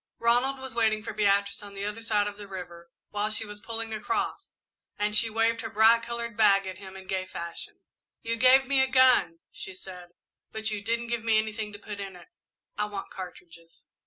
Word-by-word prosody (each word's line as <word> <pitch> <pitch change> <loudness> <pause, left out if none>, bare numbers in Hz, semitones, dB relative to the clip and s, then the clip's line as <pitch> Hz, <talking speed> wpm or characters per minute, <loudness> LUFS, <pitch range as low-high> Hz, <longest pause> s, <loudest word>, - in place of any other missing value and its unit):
Ronald 245 +4 +2
was 265 -2 -6
waiting 220 -2 +2
for 220 - -5
Beatrice 200 -1 +2
on 200 -1 -11
the 195 +1 -4
other 210 +2 -4
side 210 -2 +1
of 205 0 -5
the 205 -1 -9
river 175 -3 -9 0.2
while 210 +1 0
she 220 +1 -2
was 205 0 -9
pulling 225 +1 -4
across, 215 +2 -2 0.5
and 210 0 0
she 225 +1 +4
waved 225 +1 +1
her 225 - -5
bright 225 +2 +5
coloured 235 -1 -4
bag 200 -3 +5
at 185 0 -6
him 190 -1 -10
in 190 - -11
gay 185 0 -2
fashion. 170 -2 -8 0.4
"You 230 0 -1
gave 255 +3 +6
me 275 -1 +4
a 265 - +3
gun," 255 -11 +4
she 190 - -8
said, 180 -2 -10 0.4
"but 220 0 -2
you 210 -1 -3
didn't 230 +2 0
give 235 -1 -1
me 225 -1 +3
anything 215 0 -2
to - - -6
put 205 0 -8
in 195 -2 -6
it. 180 - -15 0.5
I 210 - +2
want 205 -2 -6
cartridges." 170 -3 -11
210 Hz, 210 wpm, -28 LUFS, 195-230 Hz, 0.5 s, gave